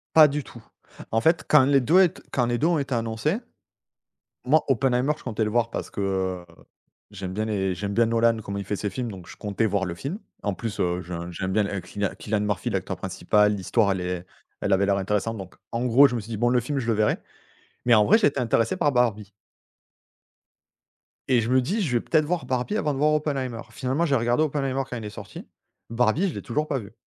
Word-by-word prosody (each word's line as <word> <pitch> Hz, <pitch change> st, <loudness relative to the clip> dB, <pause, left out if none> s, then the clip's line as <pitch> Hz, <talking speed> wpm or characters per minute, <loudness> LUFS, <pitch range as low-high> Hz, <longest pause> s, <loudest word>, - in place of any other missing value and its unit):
Pas 155 Hz, -1 st, +9 dB
du 145 Hz, 0 st, -3 dB
tout. 120 Hz, -, -13 dB, 0.5 s
En 115 Hz, -, +2 dB
fait, 160 Hz, +6 st, +2 dB
quand 150 Hz, -3 st, +6 dB
les 140 Hz, 0 st, +4 dB
2, 160 Hz, +9 st, +4 dB
elle 185 Hz, -4 st, +5 dB
t -, -, -15 dB
quand 125 Hz, -, +1 dB
les 120 Hz, 0 st, 0 dB
2 150 Hz, -, +2 dB
ont 170 Hz, -2 st, +2 dB
été 135 Hz, -2 st, -2 dB
annoncés, 115 Hz, -, -1 dB, 1.1 s
moi, 150 Hz, +5 st, +3 dB
Oppenheimer, 130 Hz, +1 st, +2 dB
je -, -, -16 dB
comptais 110 Hz, -3 st, -1 dB
le 105 Hz, -, -2 dB
voir 115 Hz, +1 st, +1 dB
parce -, -, -5 dB
que 95 Hz, -2 st, -2 dB, 0.7 s
j'aime 95 Hz, -3 st, -6 dB
bien 110 Hz, +2 st, -1 dB
les 95 Hz, -4 st, -1 dB
j'aime 100 Hz, +3 st, -4 dB
bien 115 Hz, +2 st, +4 dB
Nolan 115 Hz, 0 st, +2 dB
comment 100 Hz, 0 st, -5 dB
il 100 Hz, -, -4 dB
fait 100 Hz, +2 st, -2 dB
ses 105 Hz, +1 st, -3 dB
films, 120 Hz, +4 st, -4 dB
donc 95 Hz, -4 st, -10 dB
je -, -, -11 dB
comptais 105 Hz, +2 st, -1 dB
voir 100 Hz, -2 st, 0 dB
le 90 Hz, -3 st, -4 dB
film. 140 Hz, -, -5 dB, 0.2 s
En 100 Hz, -2 st, -1 dB
plus, 105 Hz, +4 st, -5 dB
heu, 90 Hz, 0 st, 0 dB
j'ai 90 Hz, +1 st, -9 dB
un 85 Hz, 0 st, -5 dB
j'aime 95 Hz, +2 st, -3 dB
bien 105 Hz, +1 st, +2 dB
l -, -, -5 dB
heu, -, -, -2 dB
Cillian 100 Hz, -1 st, -2 dB
Cillian 105 Hz, -1 st, -1 dB
Murphy, 105 Hz, -3 st, -1 dB
l'acteur -, -, -2 dB
principal, 105 Hz, 0 st, +1 dB
l'histoire 100 Hz, +1 st, +1 dB
elle 95 Hz, -, -2 dB
est 90 Hz, 0 st, -4 dB, 0.3 s
elle 100 Hz, -, -1 dB
avait 95 Hz, +1 st, +3 dB
l'air 100 Hz, 0 st, +2 dB
intéressante. 105 Hz, +3 st, -1 dB
Donc 95 Hz, -3 st, -9 dB, 0.2 s
en 115 Hz, +1 st, -2 dB
gros, 130 Hz, +4 st, +6 dB
je 125 Hz, -, -4 dB
me -, -, -2 dB
suis 110 Hz, +2 st, -11 dB
dit: 115 Hz, -, -3 dB
«Bon, 120 Hz, +2 st, +2 dB
le 125 Hz, 0 st, +3 dB
film, 140 Hz, +4 st, -3 dB
je 125 Hz, -, -3 dB
le 115 Hz, -, +2 dB
verrai». 105 Hz, 0 st, +1 dB, 0.7 s
Mais 120 Hz, -, +5 dB
en 105 Hz, -2 st, +6 dB
vrai, 220 Hz, -, +6 dB
j'ai 225 Hz, -, +4 dB
été 140 Hz, -1 st, -1 dB
intéressé 115 Hz, -2 st, +1 dB
par 145 Hz, -, +2 dB
Barbie. 110 Hz, -5 st, +1 dB, 2.0 s
Et 125 Hz, -2 st, +5 dB
je 115 Hz, -, -2 dB
me 130 Hz, +1 st, +4 dB
dis: 195 Hz, -, -1 dB
«Je 135 Hz, -8 st, -1 dB
vais 120 Hz, -, +2 dB
peut-être 155 Hz, -2 st, +2 dB
voir 165 Hz, -3 st, -2 dB
Barbie 130 Hz, +10 st, -1 dB
avant 150 Hz, -8 st, 0 dB
de -, -, -4 dB
voir 150 Hz, +2 st, +3 dB
Oppenheimer». 135 Hz, -6 st, -2 dB
Finalement, 135 Hz, +6 st, -1 dB
j'ai 140 Hz, -, +2 dB
regardé 120 Hz, +3 st, +1 dB
Oppenheimer 135 Hz, -3 st, -1 dB
quand 125 Hz, -, -4 dB
il 110 Hz, -, -7 dB
est -, -, -4 dB
sorti. -, -, -10 dB, 0.5 s
Barbie, 125 Hz, -, +2 dB
je 175 Hz, -, -3 dB
l'ai -, -, -6 dB
toujours 150 Hz, +6 st, -2 dB
pas 140 Hz, -3 st, -1 dB
vu. 100 Hz, -3 st, -10 dB
115 Hz, 245 wpm, -25 LUFS, 100-135 Hz, 2.0 s, Pas